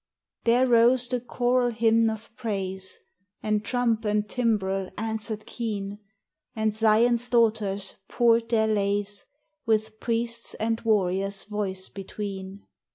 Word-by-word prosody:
There 240 +2 +4
rose 240 +1 +4
the 250 0 -1
choral 245 0 +1
hymn 225 0 +3
of 220 +1 -7
praise, 190 -4 -4 0.5
And 215 -1 0
trump 235 -2 0
and 210 0 0
timbrel 195 -5 0
answered 220 -1 -3
keen, 205 -3 -4 0.6
And 220 -1 0
Zion's 230 +2 +3
daughters 215 -5 +1
poured 235 -1 +3
their 220 -2 +3
lays, 205 -1 0 0.4
With 220 0 0
priest's 235 0 -1
and 225 +1 -1
warrior's 195 -2 +1
voice 200 -3 -3
between. 195 0 -7
220 Hz, 115 wpm, -26 LUFS, 200-230 Hz, 0.6 s, There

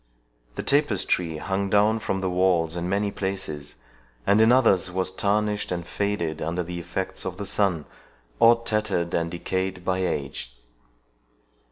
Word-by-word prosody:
The - - -4
tapestry 100 - +1
hung 95 +4 -2
down 105 +2 +3
from 95 -3 -2
the 95 - 0
walls 90 -3 +2
in 85 +1 -3
many 100 +1 0
places, 95 -8 -4 0.5
and 105 +2 +4
in 110 +1 +6
others 105 -8 +4
was 95 +1 -1
tarnished 105 +1 0
and 85 -1 -3
faded 85 -6 -2
under 85 +3 -1
the 85 +1 -5
effects 95 +2 -3
of 90 -1 -4
the 100 - -4
sun, 95 -7 +1 0.5
or 115 0 +6
tattered 105 -6 0
and 85 0 0
decayed 95 +1 -3
by 95 0 +1
age. 70 -8 -3
95 Hz, 150 wpm, -25 LUFS, 85-105 Hz, 0.5 s, in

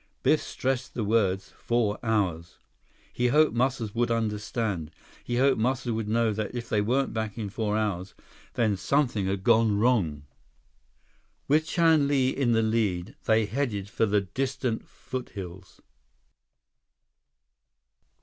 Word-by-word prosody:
Biff - - +4
stressed 130 -1 -3
the 115 - -1
words, 100 -3 +1
"four 115 -3 0
hours." 95 -8 -1 0.6
He 125 - +1
hoped 150 +5 +4
Muscles 120 -3 0
would 120 0 +1
understand. 105 -6 -2 0.3
He 120 - -2
hoped 130 -3 +3
Muscles 125 0 0
would 110 -1 -2
know 115 0 +2
that 110 +2 -4
if 120 -1 -4
they 105 - +1
weren't 130 +6 0
back 110 -1 -3
in 105 -3 -4
four 105 -1 -1
hours, 100 -3 -2 0.4
then 110 -4 +1
something 115 -1 +1
had 95 0 -2
gone 110 -2 +4
wrong. 100 - +1 1.2
With 155 +2 +3
Chan 160 -4 +3
Li 135 -3 +2
in 130 -4 +1
the 115 0 +3
lead, 110 -3 0
they 110 -3 +3
headed 105 -5 -2
for 115 - +1
the 105 0 +2
distant 130 +3 -3
foothills. 95 -7 -8
110 Hz, 135 wpm, -27 LUFS, 105-125 Hz, 1.2 s, Biff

